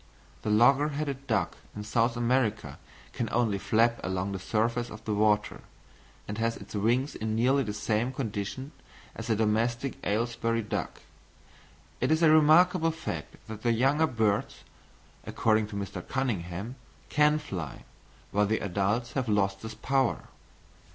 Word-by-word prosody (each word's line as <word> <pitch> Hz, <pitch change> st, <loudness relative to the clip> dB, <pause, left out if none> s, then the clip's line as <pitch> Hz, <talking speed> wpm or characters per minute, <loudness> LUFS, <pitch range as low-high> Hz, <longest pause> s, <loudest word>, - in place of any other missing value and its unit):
The -, -, -3 dB
logger 135 Hz, +7 st, +5 dB
headed 140 Hz, -2 st, -4 dB
duck 110 Hz, -5 st, 0 dB, 0.2 s
of 105 Hz, -, -5 dB
South 115 Hz, +2 st, +1 dB
America 120 Hz, -3 st, 0 dB, 0.3 s
can 115 Hz, -, -2 dB
only 115 Hz, -4 st, +1 dB
flap 115 Hz, +3 st, +2 dB
along 95 Hz, +1 st, -2 dB
the 95 Hz, -, -4 dB
surface 115 Hz, +5 st, 0 dB
of 110 Hz, -, -11 dB
the 110 Hz, -, -1 dB
water, 105 Hz, 0 st, +1 dB, 0.7 s
and 105 Hz, +1 st, -5 dB
has 115 Hz, 0 st, 0 dB
its -, -, -12 dB
wings 120 Hz, +7 st, +1 dB
in 110 Hz, 0 st, -3 dB
nearly 130 Hz, +5 st, +3 dB
the 110 Hz, -5 st, -2 dB
same 110 Hz, +3 st, -1 dB
condition 130 Hz, +2 st, -4 dB, 0.4 s
as 115 Hz, -, -7 dB
the 110 Hz, -, +2 dB
domestic 115 Hz, +5 st, 0 dB
Aylesbury 115 Hz, +1 st, 0 dB
duck: 105 Hz, -, -4 dB, 1.0 s
it 125 Hz, -, +1 dB
is 160 Hz, +1 st, +3 dB
a 160 Hz, -, +7 dB
remarkable 160 Hz, +2 st, +5 dB
fact 160 Hz, -, -5 dB
that 110 Hz, -1 st, -7 dB
the 120 Hz, 0 st, +2 dB
young 135 Hz, +7 st, +3 dB
birds, 105 Hz, -2 st, 0 dB, 0.6 s
according 110 Hz, -1 st, +2 dB
to 105 Hz, -, -8 dB
Mr. 100 Hz, -2 st, -4 dB
Cunningham, 110 Hz, -3 st, -3 dB, 0.3 s
can 150 Hz, 0 st, +4 dB
fly, 90 Hz, -, -6 dB, 0.5 s
while 105 Hz, 0 st, +2 dB
the 110 Hz, +1 st, +1 dB
adults 100 Hz, +5 st, -1 dB
have 130 Hz, -4 st, -1 dB
lost 100 Hz, -2 st, +1 dB
this 110 Hz, -1 st, -7 dB
power. 135 Hz, +4 st, 0 dB
115 Hz, 150 wpm, -28 LUFS, 105-130 Hz, 1.0 s, a